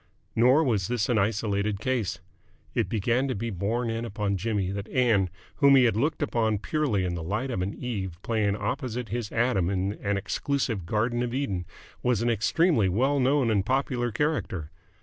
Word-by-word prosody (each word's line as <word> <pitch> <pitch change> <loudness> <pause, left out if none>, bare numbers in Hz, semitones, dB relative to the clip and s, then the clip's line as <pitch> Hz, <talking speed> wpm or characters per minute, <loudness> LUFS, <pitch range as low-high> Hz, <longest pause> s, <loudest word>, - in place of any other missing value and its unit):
Nor 125 +7 +5
was 105 - +1
this 120 -3 -1
an 115 -3 +3
isolated 100 -1 0
case. 120 -3 -1 0.5
It - - 0
began 120 +4 +1
to 130 - -2
be 115 +3 -3
borne 115 +5 -1
in 115 +1 -3
upon 105 -3 -2
Jimmy 100 -1 -1
that 100 0 -5
Ann, 115 -7 +2 0.3
whom 140 -1 +6
he 130 - +6
had 115 -4 +3
looked 145 +7 0
upon 110 -6 +1
purely 110 -5 0
in 90 - -1
the 85 - -4
light 105 +11 -2
of 95 - -2
an 95 +3 -2
Eve 95 -8 -4
playing 105 -3 +1
opposite 125 -1 -3
his 115 -1 -3
Adam 115 -7 +1
in 95 +1 -1
an 100 0 +1
exclusive 115 - -2
Garden 115 +5 0
of 120 0 -2
Eden, 100 -11 -2 0.4
was 125 -3 +1
an 120 - +2
extremely 115 - +2
well 135 +9 +2
known 130 -2 +3
and 100 -3 +2
popular 125 0 0
character. 105 - -2
115 Hz, 185 wpm, -27 LUFS, 100-125 Hz, 0.5 s, whom